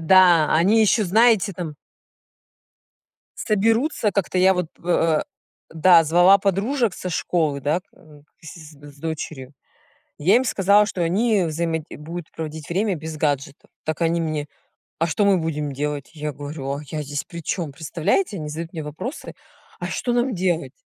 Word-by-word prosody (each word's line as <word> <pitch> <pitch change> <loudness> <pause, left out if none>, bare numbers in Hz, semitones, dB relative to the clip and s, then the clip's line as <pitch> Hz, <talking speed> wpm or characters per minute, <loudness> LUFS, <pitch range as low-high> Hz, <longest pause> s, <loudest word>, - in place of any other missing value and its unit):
Да, 175 -2 +5
они 200 +8 +4
ещё, 215 0 +3
знаете, 215 +1 +3
там 165 -4 -6 1.6
соберутся, 225 +2 +1
как-то 190 -2 -1
я 190 +1 +5
вот, 180 -2 -1 0.2
э, 165 -3 +2 0.5
да, 165 0 +5
звала 175 +5 +6
подружек 200 +4 0
со 180 - -5
школы, 155 -5 0
да, 150 +6 0
м, 150 -2 -19 0.2
к - - -21
си 165 +1 -10
с 145 -2 -14
дочерью, 150 -4 -6 0.7
я 185 +9 +3
им 255 - +4
сказала, 205 -2 +4
что 185 - -4
они 200 +4 +2
взаимо 165 0 -1
будут 165 +2 -8
проводить 155 -1 -7
время 195 +3 0
без 160 0 -7
гаджетов. 145 -2 -2 0.2
Так 155 +1 -3
они 165 0 +2
мне: 155 -2 -3 0.5
"А 165 - +1
что 205 +5 +1
мы 195 -2 +4
будем 150 -3 -2
делать?" 145 0 -4
Я 150 -1 -4
говорю: 145 0 -6
"А 140 +2 -4
я 155 +2 -4
здесь 145 0 -4
причём, 170 -1 -4
представляете?" 175 - -1
Они 155 -2 -5
задают 165 +2 -6
мне 160 - -5
вопросы: 155 - -7 0.5
"А - - -4
что 245 - -2
нам 245 +1 +1
делать?" 175 -7 -1
165 Hz, 160 wpm, -22 LUFS, 150-195 Hz, 1.6 s, звала